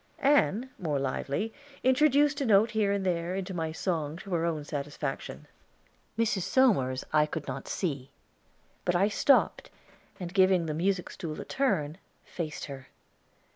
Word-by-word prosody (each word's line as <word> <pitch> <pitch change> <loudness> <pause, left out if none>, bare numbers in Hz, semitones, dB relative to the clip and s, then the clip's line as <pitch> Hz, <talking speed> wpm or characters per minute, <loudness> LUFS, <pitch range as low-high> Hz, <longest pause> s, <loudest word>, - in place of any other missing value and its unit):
Ann, 265 -4 +2
more 155 -5 -1
lively, 140 +10 -2 0.3
introduced 290 +2 +4
a - - +1
note 215 +2 +5
here 215 -3 +1
and 200 -1 -1
there 175 0 -1
into 190 0 -4
my 165 -2 -2
song 160 -2 -2
to 190 +1 -7
her 165 -1 +1
own 155 -3 -2
satisfaction. 145 -1 -5 0.7
Mrs. 220 -4 +1
Somers 170 - +2
I 150 -1 +4
could 155 -1 -5
not 135 0 -5
see; 140 -8 -3 0.7
but 180 - +1
I 195 +4 +3
stopped 275 +6 +2 0.5
and, 180 -1 -6
giving 185 -3 +4
the 155 - -2
music 180 +3 -1
stool 155 -3 -6
a - - -6
turn, 185 - 0 0.3
faced 155 -3 -5
her. 135 -2 -9
180 Hz, 150 wpm, -29 LUFS, 150-210 Hz, 0.7 s, note